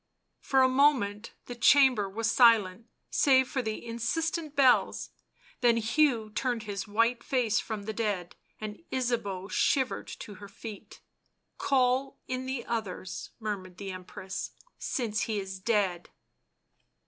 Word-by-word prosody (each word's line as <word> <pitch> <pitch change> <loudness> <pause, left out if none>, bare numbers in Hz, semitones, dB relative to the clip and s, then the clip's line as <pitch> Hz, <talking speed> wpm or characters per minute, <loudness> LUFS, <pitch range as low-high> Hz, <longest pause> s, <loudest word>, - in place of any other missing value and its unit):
For 265 -1 +3
a - - +6
moment 255 -6 +2
the 245 - -6
chamber 245 -4 +5
was 225 +3 -1
silent 230 -4 +4 0.2
save 260 -2 +4
for 260 - -2
the 220 0 -4
insistent 305 +7 -2
bells, 265 -3 +3 0.5
then 240 -2 +4
Hugh 230 -1 +2
turned 240 0 -1
his 200 -2 -5
white 230 +3 +1
face 240 -5 +1
from 215 -3 -5
the 220 +2 -4
dead, 205 -6 -2 0.2
and 215 +3 -7
Ysabeau 225 -7 -2
shivered 260 +5 +1
to 210 - -8
her 200 - -8
feet. 210 +1 -10 0.3
" - - -50
Call 265 0 +1
in 255 0 -3
the 260 -2 -3
others," 210 -5 -4
murmured 195 -5 -5
the 195 -1 -5
Empress, 185 +1 -6 0.2
" - - -35
since 225 -4 -2
he 215 -2 0
is 190 -1 -6
dead." 195 -4 0
230 Hz, 140 wpm, -29 LUFS, 205-255 Hz, 0.5 s, a